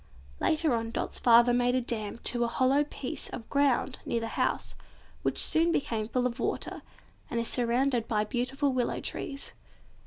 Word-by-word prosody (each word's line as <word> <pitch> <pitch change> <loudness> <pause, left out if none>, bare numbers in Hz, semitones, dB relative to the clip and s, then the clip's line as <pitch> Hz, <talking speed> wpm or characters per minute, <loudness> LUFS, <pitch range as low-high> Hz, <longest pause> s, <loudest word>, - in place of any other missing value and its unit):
Later 310 -3 +2
on, 225 -1 -1
Dot's - - -4
father 240 0 +6
made 245 +1 +2
a - - +3
dam 220 -3 -3
to 240 -1 +2
a - - +1
hollow 260 +4 +2
piece 285 -3 -5
of 230 - -8
ground 280 -3 +1
near 235 - -1
the 225 0 -4
house, - - -1 0.5
which - - -1
soon 330 +1 +5
became 225 -8 -1
full 250 +2 0
of 250 0 -2
water, - - -3 0.5
and 235 - -1
is 230 - -1
surrounded 245 0 +1
by 215 -3 +1
beautiful 260 +5 -1
willow 250 -2 -1
trees. 275 -1 -5
245 Hz, 175 wpm, -29 LUFS, 235-270 Hz, 0.5 s, father